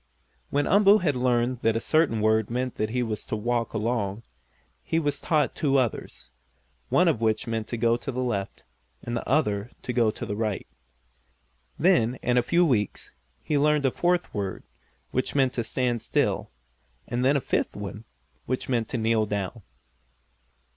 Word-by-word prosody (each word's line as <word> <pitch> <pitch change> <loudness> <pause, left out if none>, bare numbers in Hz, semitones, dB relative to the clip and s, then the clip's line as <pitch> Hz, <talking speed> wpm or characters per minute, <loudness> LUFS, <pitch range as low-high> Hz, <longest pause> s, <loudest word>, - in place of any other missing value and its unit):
When 145 +1 +1
Umboo 200 +1 +6
had 160 -8 0
learned 125 0 +1
that 115 0 +2
a - - +1
certain 145 -5 +2
word 110 0 +2
meant 125 +1 -2
that 110 - -1
he 125 +2 0
was 110 -3 -4
to - - -2
walk 115 +2 -1
along, 110 -1 -1 0.6
he 160 - -1
was 145 -3 0
taught 150 -4 +1
two 140 -2 +1
others, 65 - -2 0.6
one - - +4
of 115 - +1
which 110 +1 +1
meant 115 -2 -3
to 120 - -4
go 115 +1 +2
to 120 +3 -5
the 130 0 -2
left, 100 -6 -3 0.4
and 120 - -3
the 115 - -4
other 105 -7 +1
to 125 - -3
go 115 -2 +3
to 105 - -5
the 105 - -3
right. 110 -2 -2 1.1
Then, 145 -9 +3
in 125 - +2
a 125 - +5
few 170 +8 +3
weeks, 110 - -1 0.3
he 150 -2 +1
learned 150 -1 +3
a 135 - +3
fourth 175 +4 0
word, 100 -3 -3 0.5
which 130 +2 -1
meant 135 -2 +3
to 120 - -1
stand 120 0 -1
still, - - 0 0.6
and 120 +1 -1
then 140 +2 +4
a - - +1
fifth - - -1
one, 105 +1 -6 0.4
which 130 +1 -2
meant 115 -4 0
to 125 - -2
kneel 110 -1 +1
down. 105 +2 -3
120 Hz, 180 wpm, -26 LUFS, 110-135 Hz, 1.1 s, Umboo